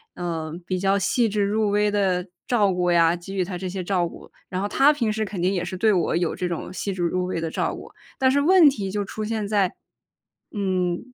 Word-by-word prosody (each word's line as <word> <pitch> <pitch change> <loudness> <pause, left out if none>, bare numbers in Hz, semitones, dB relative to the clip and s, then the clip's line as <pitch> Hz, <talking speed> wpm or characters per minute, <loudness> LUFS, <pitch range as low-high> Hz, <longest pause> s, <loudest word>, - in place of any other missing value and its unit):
呃， 165 -3 -4
比 185 +1 -2
较 195 +1 +2
细 235 +2 +1
致 205 0 -1
入 210 +1 +1
微 210 +1 +2
的 190 -2 0 0.2
照 205 -6 +2
顾 180 -1 +1
呀， 170 0 +4
给 175 +3 -9
予 185 - +1
她 180 -1 -5
这 185 0 -4
些 185 0 -4
照 180 -2 +1
顾， - - -12 0.2
然 185 +1 -3
后 205 - -1
她 275 +7 +5
平 235 -7 0
时 220 0 -1
肯 190 -3 -5
定 185 +2 +2
也 175 -2 -1
是 185 +1 -5
对 215 +2 +3
我 175 - +1
有 175 -1 0
这 180 - -2
种 170 +2 -5
细 195 +1 -3
致 180 -2 -3
入 180 +2 0
微 180 -2 -2
的 165 - -2
照 - - -1
顾， - - -11 0.3
但 260 -1 +4
是 285 +1 +2
问 345 -1 +7
题 200 -7 -4
就 205 -1 -2
出 215 +2 -5
现 215 -2 -2
在， 200 -3 +1 0.8
嗯， 185 -4 -1
195 Hz, 260 characters per minute, -24 LUFS, 180-210 Hz, 0.8 s, 问